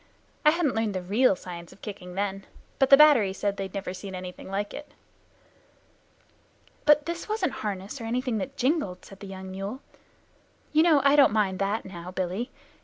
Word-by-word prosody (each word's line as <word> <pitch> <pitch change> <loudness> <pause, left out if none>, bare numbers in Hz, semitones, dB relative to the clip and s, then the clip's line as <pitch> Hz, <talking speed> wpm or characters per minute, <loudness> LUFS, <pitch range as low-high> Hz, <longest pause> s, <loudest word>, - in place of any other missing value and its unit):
I 300 - +7
hadn't 315 -4 +1
learned 220 -3 -1
the 185 - -3
real 210 +4 +3
science 170 -2 -9
of - - -18
kicking 185 -4 -8
then, 195 0 -3 0.3
but 270 - +4
the 275 - +10
battery 275 -10 +6
said 200 0 -1
they 195 - -3
had 190 - -10
never 195 -2 -4
seen 190 0 -7
anything 180 0 -8
like 200 +1 -3
it." 295 - -10 1.9
"But 295 0 +6
this 340 +5 -5
wasn't 425 -8 0
harness 205 +4 -4
or - - -5
anything 245 -1 -1
that 275 +5 -6
jingled," 255 - 0
said 195 - -13
the 200 - -9
young 190 0 -8
mule. 195 +7 -5 0.9
"You 310 - +5
know 320 -4 +5
I 280 +1 +6
don't 285 -2 +6
mind 195 -4 +1
that 200 +3 -1
now, 175 -2 -8
Billy. 185 +6 -3
205 Hz, 185 wpm, -27 LUFS, 190-275 Hz, 1.9 s, the